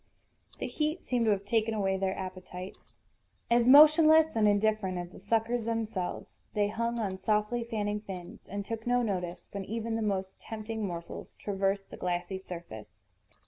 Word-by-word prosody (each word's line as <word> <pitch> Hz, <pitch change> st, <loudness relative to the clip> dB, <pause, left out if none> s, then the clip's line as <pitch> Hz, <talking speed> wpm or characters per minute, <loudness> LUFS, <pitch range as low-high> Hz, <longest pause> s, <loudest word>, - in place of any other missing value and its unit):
The -, -, -3 dB
heat 310 Hz, +3 st, -2 dB
seemed 245 Hz, -2 st, 0 dB
to 220 Hz, -, +4 dB
have 200 Hz, -1 st, 0 dB
taken 220 Hz, +1 st, +1 dB
away 195 Hz, -2 st, +1 dB
their 190 Hz, 0 st, -1 dB
appetites. 185 Hz, 0 st, -8 dB, 0.6 s
As 235 Hz, 0 st, +4 dB
motionless 310 Hz, +2 st, +8 dB
and 215 Hz, -2 st, +4 dB
indifferent 205 Hz, -2 st, +2 dB
as 175 Hz, 0 st, -5 dB
the -, -, -12 dB
suckers 225 Hz, +3 st, 0 dB
themselves, 225 Hz, -5 st, -3 dB, 0.2 s
they 205 Hz, -1 st, +2 dB
hung 230 Hz, +2 st, -1 dB
on 195 Hz, -4 st, -2 dB
softly 210 Hz, +4 st, +1 dB
fanning 210 Hz, -2 st, -2 dB
fins, 180 Hz, -4 st, -8 dB
and 200 Hz, +1 st, -4 dB
took 225 Hz, +2 st, -5 dB
no 245 Hz, 0 st, +3 dB
notice 180 Hz, -4 st, -3 dB
when 200 Hz, -1 st, -4 dB
even 225 Hz, +3 st, -3 dB
the 225 Hz, -, -1 dB
most 190 Hz, -3 st, -2 dB
tempting 220 Hz, -1 st, -4 dB
morsels 170 Hz, -2 st, -7 dB
traversed 195 Hz, 0 st, -1 dB
the -, -, -8 dB
glassy 180 Hz, +1 st, -2 dB
surface. 170 Hz, -, -8 dB
210 Hz, 165 wpm, -30 LUFS, 190-230 Hz, 0.6 s, motionless